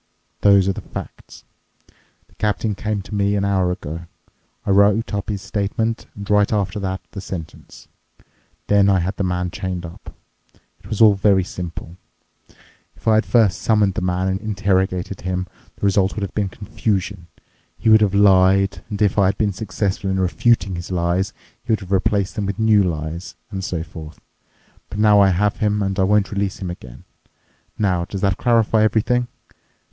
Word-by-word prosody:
Those 100 -2 +5
are 95 - +1
the - - -7
facts. - - -10 0.8
The - - -28
captain 105 0 0
came 105 0 -3
to 105 - -11
me 100 0 +1
an 100 -1 0
hour 95 -2 +1
ago. 85 0 -6 0.6
I - - 0
wrote 100 +3 +3
up 100 -1 -3
his 100 -2 -3
statement 105 +3 -2
and 100 -1 -8
right 105 -1 +3
after 100 -2 -1
that 95 -1 -3
the 100 - -7
sentence. 90 -5 -9 0.8
Then 100 -1 +4
I 95 - +4
had 95 +2 -2
the - - -1
man 90 -1 -1
chained 90 -2 -4
up. 85 - -11 0.6
It - - -16
was 110 - -3
all 110 -2 +8
very 95 -1 +3
simple. 85 -1 -7 1.0
If - - -15
I 110 - +5
had 110 +1 +2
first 110 -6 +3
summoned 105 -3 +2
the - - -3
man 90 +1 0
and 95 +1 -1
interrogated 95 -3 -1
him, 90 0 -2 0.3
the - - -16
result 100 -1 +2
would 105 - -3
have 100 - -4
been 100 -2 -1
confusion. 100 -2 -3 0.5
He 115 - -4
would 110 0 +7
have 100 -2 +2
lied, 95 -1 +4
and 100 -2 -4
if 105 0 +2
I 95 - +5
had 95 - 0
been 105 -2 0
successful 95 0 -2
in 95 0 0
refuting 95 +1 +1
his 85 - -7
lies, 90 +2 0 0.3
he - - -3
would 110 - +1
have 95 -1 -10
replaced 100 0 +1
them 105 -4 -2
with 100 - -3
new 110 -2 +4
lies, 85 0 -4 0.2
and 95 -2 -4
so 85 -3 -3
forth. 80 -2 -11 0.7
But - - -7
now 105 -1 +5
I 100 -1 +6
have 100 +3 +1
him, 105 -1 0
and 95 0 -2
I - - +4
won't 105 0 +2
release 100 -2 -2
him 90 -3 -4
again. 65 -8 -11 0.7
Now, 90 -5 +1
does 95 +1 -6
that 100 -3 +1
clarify 115 -2 +3
everything? 115 +3 +2
100 Hz, 185 wpm, -20 LUFS, 95-105 Hz, 1.0 s, all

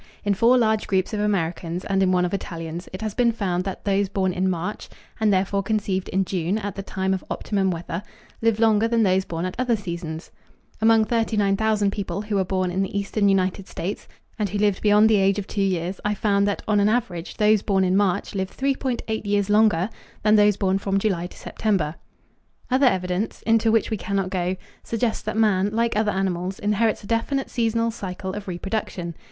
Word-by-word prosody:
In 205 - +3
four 235 +6 +4
large 220 -3 +1
groups 190 0 0
of 210 - -1
Americans 175 -3 -1
and 195 -1 +1
in 185 -1 +3
one 180 -1 +3
of 175 - -3
Italians 170 -2 -5
it 185 +3 -6
has 215 -2 -2
been 240 0 +3
found 185 -5 -2
that 195 - -5
those 200 -1 +1
born 190 -2 0
in 185 +1 0
March, 180 +3 -4 0.3
and 215 -1 +3
therefore 195 +1 +1
conceived 195 -2 -1
in 190 0 +1
June 180 +2 -1
at 205 -2 -4
the 195 - -5
time 190 -1 -2
of 190 - -3
optimum 195 -2 0
weather, 170 0 -4 0.4
live 225 -1 +2
longer 220 -1 +4
than 230 -1 +2
those 190 -1 +2
born 165 +1 -3
at 185 - -3
other 250 -2 +2
seasons. 170 -5 -6 0.5
Among 225 0 +5
39,000 215 -2 +1
people 200 0 -4
who 210 -1 -3
were 190 - +3
born 185 -1 -1
in 190 +2 0
the 195 +1 -2
eastern 200 0 +1
United 190 0 0
States 190 +5 -5 0.3
and 210 -2 0
who 205 - -2
lived 205 -2 +1
beyond 210 +1 +5
the 220 -1 +4
age 195 0 +3
of 205 - -3
two 200 - -3
years 185 -1 -1
I 210 0 0
found 200 -1 +2
that 205 - -2
on 210 -1 +3
an 200 +1 +4
average 215 -8 -2
those 210 -1 +4
born 195 -2 +1
in 185 0 +2
March 195 -3 +1
lived 190 -1 -4
3.8 260 -5 -1
years 205 0 +1
longer 210 -4 +4 0.4
than 215 0 +5
those 210 -1 +4
born 195 -1 +1
from 195 0 0
July 190 -4 0
to - - -15
September. 190 -9 -1 0.8
Other 260 +1 +4
evidence, 185 0 -1
into 225 0 +3
which 225 0 +2
we 220 - 0
cannot 195 0 -2
go, 180 0 -1 0.3
suggests 230 0 -1
that 215 0 -4
man, 205 -3 +3
like 230 +1 0
other 215 0 +2
animals, 190 -1 -2
inherits 210 +1 0
a - - -9
definite 265 +5 -1
seasonal 230 -1 +1
cycle 190 -3 -5
of 205 0 -6
reproduction. 180 -1 -3
200 Hz, 205 wpm, -23 LUFS, 185-215 Hz, 0.8 s, Among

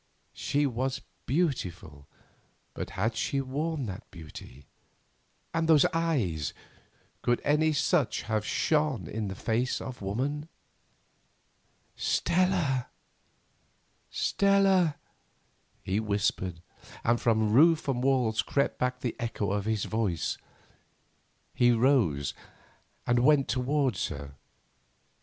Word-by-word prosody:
She 145 +1 0
was 130 0 -2 0.3
beautiful, 90 - -2 0.7
but - - -5
had 110 +4 0
she 140 +5 -1
worn 145 +2 -2
that 100 +2 -7
beauty? 75 -5 -11 0.9
And 165 0 0
those 155 -3 +6
eyes! 120 - 0 0.7
Could 120 0 +1
any 150 +2 +3
such 150 -1 +1
have 110 -1 -1
shone 150 - +1
in 110 +3 -3
the 95 - -5
face 120 +6 -1
of 130 -3 -7
woman? 140 +10 -2 1.5
"Stella," 170 -8 +1 3.0
he 95 +2 0
whispered, 95 -5 -1 0.4
and 120 0 +2
from 110 -2 +2
roof 160 +5 +5
and 125 -2 0
walls 125 -6 +2
crept 140 0 0
back 125 0 -1
the 120 - -2
echo 115 -4 -2
of 100 0 -1
his 110 -2 0
voice. 105 -7 -1 1.1
He 120 - +4
rose 115 - +2 0.7
and 120 0 +3
went 140 +2 +4
towards 130 0 0
her. 70 -1 -7
120 Hz, 100 wpm, -29 LUFS, 100-145 Hz, 3.0 s, those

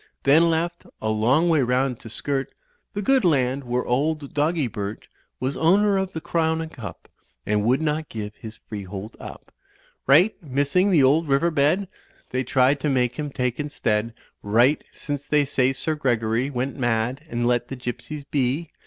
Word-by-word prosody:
| - - -49
Then 160 +5 +5
left, 170 +1 -2
a 110 - -2
long 120 +10 +3
way 160 -4 +3
round, 125 0 0
to 115 - -10
skirt; 135 +4 -2 0.4
The 205 - -2
good 265 +3 +3
land 140 -5 +2
where 125 0 -1
old 145 +3 -1
Doggy 150 +1 +1
Burt 105 -2 -5
I - - -41 0.2
Was 130 +3 -2
owner 200 +5 +3
of 190 -1 -3
the 160 - -3
Crown 160 -1 0
and 160 -1 -5
Cup, 110 - -9 0.4
And 105 0 +1
would 130 +6 +2
not 155 0 -1
give 105 -2 -6
his 110 0 -9
freehold 100 0 -7
up; - - -11 0.5
Right, 170 +11 +5
missing 145 +6 +1
the 165 -8 +5
old 150 +5 +3
river 145 +5 +2
bed, 155 +6 +2 0.2
| - - -33
They 130 +1 0
tried 130 +2 +3
to 150 - -1
make 125 -1 0
him 150 -1 -2
take 125 -1 -2
instead 115 -6 -1 0.3
Right, 120 +8 +3
since 145 -1 -5
they 150 -1 +3
say 130 -1 +2
Sir 145 +4 -2
Gregory 120 -3 0
Went 130 0 -3
mad 120 +3 0
and 120 -2 -1
let 120 0 +1
the 135 - -6
Gypsies 130 +4 -6
be. 140 +4 0
135 Hz, 185 wpm, -24 LUFS, 120-155 Hz, 0.5 s, Then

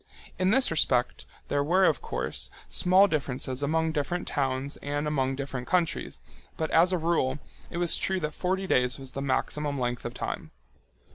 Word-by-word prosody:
In 185 0 +3
this 260 +1 +4
respect, 125 -6 +1 0.2
there 145 - +1
were, 185 +6 +4
of - - +2
course, - - -3 0.2
small 185 +2 +5
differences 135 -5 -2
among 160 +3 +1
different 155 +3 -2
towns 135 -1 -1
and 145 +1 -3
among 135 -3 0
different 135 -2 -5
countries, 175 -3 0 0.4
but 160 -1 -2
as 170 +3 +5
a 185 - +2
rule 160 -5 +1 0.3
it 170 - -6
was 175 -1 +3
true 190 0 -1
that 150 0 -2
forty 190 +1 -1
days 125 -7 +2
was 135 -2 -8
the 135 - -5
maximum 140 +1 -1
length 120 -1 -2
of 120 +1 -5
time. - - -4
145 Hz, 170 wpm, -28 LUFS, 135-175 Hz, 0.4 s, small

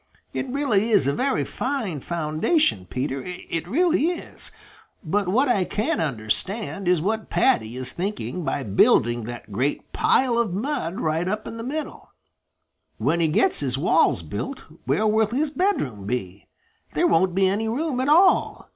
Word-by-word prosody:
It 270 - -3
really 245 -6 +1
is 210 - +4
a 140 - +1
very 265 - 0
fine 240 - -3
foundation, 155 - 0
Peter; 130 - -3
it 175 -2 -5
really 325 - +2
is. 350 -1 -5 0.5
But 200 +3 0
what 250 +10 +2
I 210 -7 +2
can't 210 +1 -1
understand 170 - -2
is 175 -3 +3
what 220 +3 -2
Paddy 125 - +1
is 130 -1 -3
thinking 195 +1 -4
of 175 - -4
by 140 - -1
building 115 +2 +3
that 120 -2 -8
great 130 +8 -2
pile 245 -3 +2
of 215 -7 0
mud 205 - -2
right 160 +3 0
in 215 +3 -4
the - - -5
middle. 300 +5 -5 0.9
When 170 - +1
he 165 - +3
gets 155 - +2
his 135 -2 -1
walls 110 - +3
built, 100 - -5 0.2
where 215 - +1
will 215 0 +3
his 280 +7 -1
bedroom 145 - -1
be? 100 -5 -4 0.5
There - - +2
won't 175 +2 +3
be 190 0 +3
any 205 +4 0
room 270 +2 -1
at 260 +2 0
all. 355 +5 +3
190 Hz, 165 wpm, -24 LUFS, -, 0.9 s, is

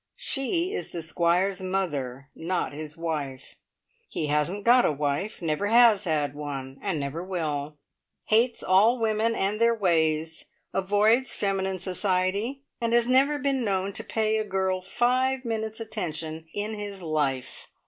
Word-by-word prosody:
She 335 +7 -1
is - - -4
the 170 -2 -5
Squire's 175 +4 +1
mother, 145 -8 -3
not 170 -1 -2
his 150 +1 -7
wife. 150 -6 -4 0.5
He 155 - -2
hasn't 150 +7 0
got 245 +2 +6
a - - +3
wife; 145 +8 -2
never 160 +5 0
has 225 -2 +6
had 150 -4 0
one, 135 -2 -6
and 190 -6 -1
never 140 +5 -4
will. 150 -5 -3 0.5
Hates 230 +2 +2
all 205 +7 +4
women 225 0 +1
and 205 +2 -1
their 230 0 +4
ways. 160 -5 +1 0.3
Avoids 210 +6 +3
feminine 190 -1 -1
society, 190 +7 -1 0.2
and 230 0 0
has 235 0 +4
never 270 +4 +3
been 275 -3 0
known 195 -2 -1
to - - -2
pay 220 -1 0
a - - 0
girl 190 -2 -1
five 255 +6 +1
minutes' 220 -1 -3
attention 160 -7 -5
in 210 +3 -3
his 200 -2 -6
life! 145 -5 -2
190 Hz, 150 wpm, -26 LUFS, 160-225 Hz, 0.5 s, got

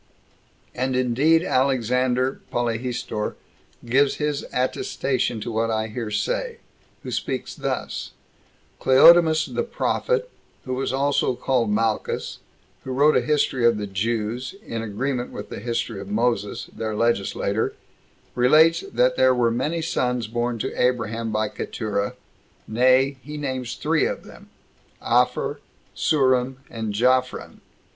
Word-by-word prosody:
And 130 +1 -1
indeed 135 +7 +3
Alexander 130 -1 +1
Polyhistor 120 -2 -2 0.5
gives 135 +4 +3
his 150 -1 -2
attestation 125 -1 -1
to 120 - -4
what 115 +1 0
I 110 0 -1
here 115 0 -4
say; 105 0 -2 0.5
who - - -6
speaks - - -3
thus: - - -4 0.7
"Cleodemus 160 +4 +6
the - - -2
prophet, 485 +1 -1 0.3
who 130 - -3
was 130 +1 -1
also 135 -1 +1
called 120 -3 0
Malchus, 110 +1 -1 0.4
who 130 - -6
wrote 145 +4 +4
a - - +4
History 145 -4 +1
of 115 -2 +4
the 105 - -3
Jews, 115 - -2
in 115 -1 -4
agreement 120 +4 -3
with - - -8
the - - -6
History 115 -2 -3
of 100 - -8
Moses, 105 -1 0
their 110 -1 -3
legislator, 105 -1 0 0.6
relates, 155 +7 +5
that 125 -5 +1
there 130 0 +5
were 120 -2 +2
many 155 +8 -1
sons 125 -6 0
born 120 +2 -2
to 130 - -3
Abraham 115 -2 0
by 110 0 0
Keturah: 105 -1 -3 0.5
nay, 130 +4 +3
he 150 +2 -8
names 130 -4 -3
three - - +1
of - - -5
them, - - -14 0.5
Apher, - - +1
and - - -28 0.3
Surim, 130 -3 +2 0.2
and 110 -2 -3
Japhran. 125 +4 0
125 Hz, 130 wpm, -23 LUFS, 115-135 Hz, 0.7 s, Cleodemus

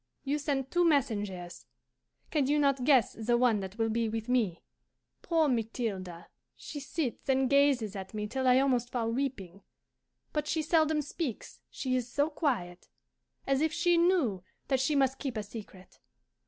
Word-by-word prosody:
You 290 +2 -1
sent 275 -2 -2
two 350 0 +3
messengers: 205 - -1 0.6
can 290 -4 +1
you 295 +2 +2
not 275 -3 +2
guess 260 -7 +4
the 235 +2 0
one 235 -4 +3
that 190 +1 -7
will 225 -1 +1
be 225 0 0
with 225 +1 -4
me? 225 -9 +1 0.6
Poor 325 -2 +2
Mathilde, 220 -8 -3 0.3
she 295 - -8
sits 280 -2 -4
and 265 0 +3
gazes 275 -6 +3
at 190 -1 -6
me 210 -1 -3
till 260 +4 -2
I 250 0 +6
almost 255 -3 +2
fall 230 -2 -1
weeping. 225 -8 -3 0.7
But 300 -1 -1
she 315 0 0
seldom 315 -1 +2
speaks, 285 -4 -5
she 255 -2 -2
is 245 -1 -2
so 290 +4 +1
quiet 185 - -2 0.6
as 275 0 +1
if 315 0 +2
she 350 +2 +2
knew 335 - +2 0.3
that 265 -2 +2
she 280 +3 +1
must 270 -1 +2
keep 265 -5 -4
a 215 - -2
secret. 200 -3 -11
255 Hz, 170 wpm, -30 LUFS, 220-285 Hz, 0.7 s, I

